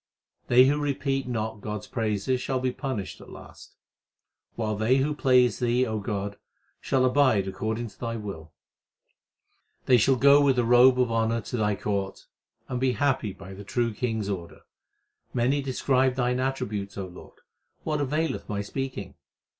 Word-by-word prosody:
They 125 +1 +7
who 145 +2 +2
repeat 135 -2 -1
not 110 -3 -3
God 105 0 -4
s - - -12
praises 115 +1 -1
shall 130 -1 -1
be 130 0 0
punished 105 - -5
at - - -13
last; - - -13 0.8
While 110 -2 -2
they 110 +5 +2
who 140 +3 +1
please 125 -6 +3
Thee, 125 +1 +2
O 110 -2 -2
God, 100 -1 -4 0.4
shall 130 -1 +1
abide 130 -7 +3
according 110 +4 -3
to - - -22
Thy 115 -1 -3
will: 100 -8 -7 1.3
They 125 - +6
shall 130 +4 +4
go 140 +3 +6
with 135 -3 +3
a 120 - +2
robe 125 +2 +6
of 125 -2 +2
honour 115 0 +1
to 115 - -6
Thy 105 -2 +1
court 100 -1 -3 0.4
and 125 - -3
be 130 0 +2
happy 125 -3 0
by 95 0 -11
the 100 +2 -9
True 115 +2 -1
King 110 0 -2
s 100 - -4
order. 90 -4 -6 0.7
Many 130 +4 +2
describe 130 -1 +1
Thine 125 -1 0
attributes, 105 -7 -3
O 95 - -3
Lord; 90 0 -13 0.5
what 150 -2 -1
availeth 150 +1 -2
my 100 -1 -2
speaking 130 -2 -5
120 Hz, 170 wpm, -26 LUFS, 105-130 Hz, 1.3 s, They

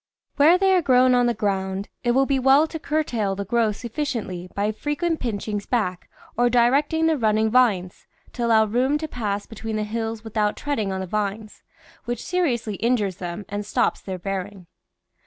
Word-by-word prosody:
Where 310 +5 +6
thej' 380 -1 +4
are - - -1
grown 255 -3 +4
on 245 -1 +3
the 240 - 0
ground, 195 -1 -2 0.2
it 240 -1 +2
will 270 +2 +3
be 270 -1 +1
well 270 +4 +5
to 320 0 -7
curtail 245 -11 -1
the 200 +1 -4
growth 220 0 +1
sufficiently 230 - -4
by 205 +1 0
frequent 305 +8 -2
pinchings 210 -3 -3
back 185 -7 -1 0.3
or 245 +1 +3
directing 275 +7 +3
the 320 -3 +2
running 220 -1 +2
vines, 210 -8 +1 0.3
to 240 -1 -1
allow 220 -1 +5
room 250 +7 +1
to 315 +1 -4
pass 205 -7 -3
between 225 -1 -6
the 215 - -1
hills 225 +1 -4
with 220 -1 -10
out 210 -1 +1
treading 230 -9 -2
on 190 0 -3
the - - -3
vines, 210 +2 -4 0.4
which 240 -1 -4
seriously 245 - -1
injures 215 -6 0
them 175 +3 -6
and 205 +1 -4
stops - - 0
their 190 -1 -5
bearing. 195 +1 -5
225 Hz, 185 wpm, -23 LUFS, 205-260 Hz, 0.4 s, Where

